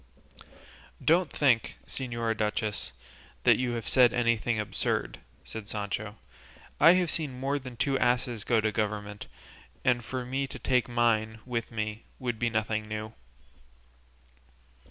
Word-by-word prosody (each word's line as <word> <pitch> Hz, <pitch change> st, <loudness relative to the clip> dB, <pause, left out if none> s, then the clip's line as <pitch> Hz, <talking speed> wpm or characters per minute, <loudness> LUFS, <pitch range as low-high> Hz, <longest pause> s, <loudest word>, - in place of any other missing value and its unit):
"Don't 170 Hz, +1 st, +4 dB
think, 125 Hz, -6 st, +2 dB
señora 115 Hz, -3 st, -2 dB
duchess, 105 Hz, 0 st, -1 dB, 0.5 s
that -, -, +5 dB
you 125 Hz, -1 st, 0 dB
have 115 Hz, -3 st, -4 dB
said 125 Hz, -3 st, +5 dB
anything 115 Hz, -1 st, +1 dB
absurd," 105 Hz, -2 st, -1 dB, 0.2 s
said 110 Hz, -2 st, -7 dB
Sancho; 105 Hz, 0 st, -4 dB, 0.6 s
"I 165 Hz, +4 st, +9 dB
have 180 Hz, -3 st, +2 dB
seen 140 Hz, -6 st, -3 dB
more 140 Hz, +2 st, 0 dB
than 130 Hz, -3 st, -9 dB
two 135 Hz, +3 st, +1 dB
asses 120 Hz, -3 st, +1 dB
go 115 Hz, -2 st, +3 dB
to 110 Hz, 0 st, +1 dB
governments, 105 Hz, -1 st, -3 dB, 0.6 s
and 120 Hz, -1 st, +3 dB
for 125 Hz, +1 st, -4 dB
me 135 Hz, +2 st, -1 dB
to -, -, -7 dB
take 125 Hz, -1 st, +1 dB
mine 110 Hz, -2 st, +1 dB
with 120 Hz, -2 st, -2 dB
me 110 Hz, 0 st, -3 dB, 0.2 s
would 120 Hz, -4 st, -3 dB
be 120 Hz, -, +2 dB
nothing 110 Hz, -1 st, -1 dB
new." 110 Hz, +1 st, -4 dB
115 Hz, 135 wpm, -29 LUFS, 110-125 Hz, 0.6 s, I